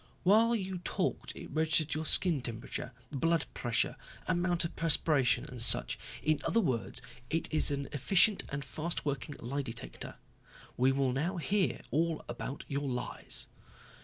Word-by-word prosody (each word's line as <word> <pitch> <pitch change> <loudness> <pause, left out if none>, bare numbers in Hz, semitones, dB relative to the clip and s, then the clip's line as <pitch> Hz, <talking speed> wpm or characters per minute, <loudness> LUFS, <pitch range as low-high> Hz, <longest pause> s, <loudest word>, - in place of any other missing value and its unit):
While 225 +5 +5
you 190 -4 -3
talked 175 - -2
it - - -9
registered 155 0 +3
your 155 0 -2
skin 170 -7 +2
temperature, 120 +1 -5 0.2
blood 165 +3 +1
pressure, 120 -1 0 0.3
amount 175 0 +1
of 165 - -5
perspiration 150 -5 +2
and 125 -2 -5
such. 115 - +5 0.2
In 155 -1 +2
other 230 - +2
words 130 - -1 0.3
it 165 +1 0
is 155 - +4
an 140 -1 -2
efficient 190 - +4
and 140 0 -4
fast 155 +5 -3
working 145 +1 -2
lie 135 +5 -3
detector. 115 -3 -6 0.6
We 130 +2 +4
will 135 -1 +1
now 165 +9 -1
hear 190 +3 +1
all 165 +1 0
about 120 +3 -5
your 140 0 -2
lies." 125 -2 -2
150 Hz, 150 wpm, -32 LUFS, 135-170 Hz, 0.6 s, While